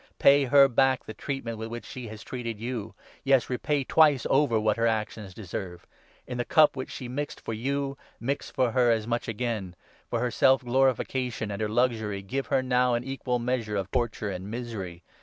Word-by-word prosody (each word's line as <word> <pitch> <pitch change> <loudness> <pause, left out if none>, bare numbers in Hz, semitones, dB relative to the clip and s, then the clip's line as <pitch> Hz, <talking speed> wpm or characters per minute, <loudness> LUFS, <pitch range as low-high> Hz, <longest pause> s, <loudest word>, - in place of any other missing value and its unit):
Pay 140 0 +6
her 140 +1 +7
back 130 0 +2
the 110 - -7
treatment 115 -3 -4
with 110 - -4
which 120 +1 -6
6 - - -10
she 125 -2 -6
has 110 0 -9
treated 115 -4 -5
you; 115 -2 -4 0.3
yes, 135 -2 +3
repay 140 +3 0
twice 145 -2 +4
over 135 -5 +3
what 110 0 +1
her 115 0 +2
actions 110 -2 -2
deserve; 95 -4 -6 0.4
in 125 - -5
the - - +1
cup 155 +3 +5
which 130 - -5
she 125 - -6
mixed 145 +4 -4
for 115 - -5
you, 140 +4 -2 0.2
mix 135 +4 -2
for 125 -2 +1
her 125 0 +3
as 110 -2 +2
much 120 +1 -2
again; 110 -5 -3 0.3
for 120 - -1
her 125 +1 0
self 130 +4 +4
glorification 125 -3 0
and 100 +2 -4
her 105 - 0
luxury, 110 -4 0
give 135 +8 -3
her - - +1
7 130 - -7
now 125 -1 +3
an 120 - -2
equal 135 -1 -2
measure 120 -3 -2
of 95 -2 -3
torture 115 -4 -1
and 95 +1 -6
misery. 105 -7 -6
120 Hz, 205 wpm, -27 LUFS, 110-130 Hz, 0.4 s, her